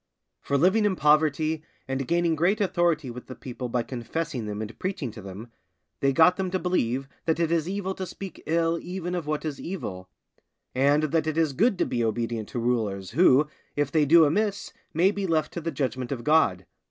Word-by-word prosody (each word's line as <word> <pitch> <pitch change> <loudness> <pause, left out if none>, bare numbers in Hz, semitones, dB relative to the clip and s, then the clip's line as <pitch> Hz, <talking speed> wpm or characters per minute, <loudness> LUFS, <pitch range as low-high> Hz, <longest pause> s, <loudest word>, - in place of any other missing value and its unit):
For 140 - 0
living 190 +8 +4
in 200 -2 +2
poverty, 155 0 +2 0.2
and 135 -1 -2
gaining 170 -1 +2
great 175 +7 +2
authority 175 -8 +1
with 125 +1 -10
the 130 - -8
people 125 -1 -6
by 120 0 0
confessing 125 +1 -4
them 105 0 -4
and 110 +1 -6
preaching 185 - -3
to 110 - -10
them, 100 +4 -9 0.5
they 135 - +2
got 160 +6 +5
them 190 -1 -1
to 185 - 0
believe 135 -8 0 0.2
that 160 0 +1
it 165 -1 +1
is 165 0 +1
evil 190 -1 -2
to 190 -1 -5
speak 195 0 -8
ill 165 +1 +1
even 180 0 -5
of 175 -4 -3
what 155 +1 -2
is 150 -3 -4
evil; 95 - -6 0.6
and 140 +4 +3
that 155 +1 +1
it 155 0 -1
is 160 -4 +2
good 205 - +2
to - - +1
be 120 -1 -1
obedient 115 0 -2
to - - -6
rulers, 110 -6 -1
who, 150 -4 +5 0.3
if 145 -1 0
they 155 -1 +3
do 165 +2 +7
amiss, 205 +6 -1 0.2
may 180 +5 +3
be 200 -2 -3
left 155 -2 0
to 170 - -4
the 165 - -2
judgment 130 -4 -3
of 125 -4 -3
God. 115 - +3
155 Hz, 205 wpm, -26 LUFS, 125-175 Hz, 0.6 s, do